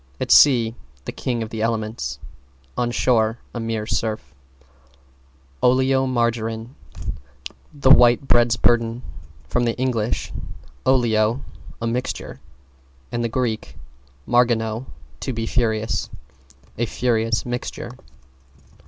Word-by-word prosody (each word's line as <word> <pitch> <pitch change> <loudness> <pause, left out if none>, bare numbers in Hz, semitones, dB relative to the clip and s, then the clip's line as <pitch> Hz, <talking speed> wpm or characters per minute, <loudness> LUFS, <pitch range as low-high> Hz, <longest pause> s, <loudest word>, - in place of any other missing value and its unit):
At - - -2
sea, 120 -6 +6 0.3
the - - -3
king 120 -3 -2
of 110 - -8
the 110 - -4
elements; 110 - -2 0.6
on 120 -1 0
shore, 115 -2 +2 0.2
a 120 - -4
mere 115 -1 -2
surf. 110 -5 -2 1.3
=OLEOMARGARINE= 120 -3 +1 1.0
The 140 -3 +3
White 125 0 +6
Bread's 120 -2 +4
Burden. 115 +1 +2 0.4
From 120 -1 +1
Eng. 125 +2 0 0.9
olio, 120 -1 +2 0.3
a 115 - -3
mixture, 120 +2 -3 0.7
and 120 0 -1
Grk. 120 -4 -2 0.5
margino, 120 -1 +2 0.3
to 130 - -3
be 115 -1 -2
furious. 110 -2 0 0.7
A 120 - +1
furious 115 -2 0
mixture. 120 -1 -4
120 Hz, 100 wpm, -22 LUFS, 115-125 Hz, 1.3 s, sea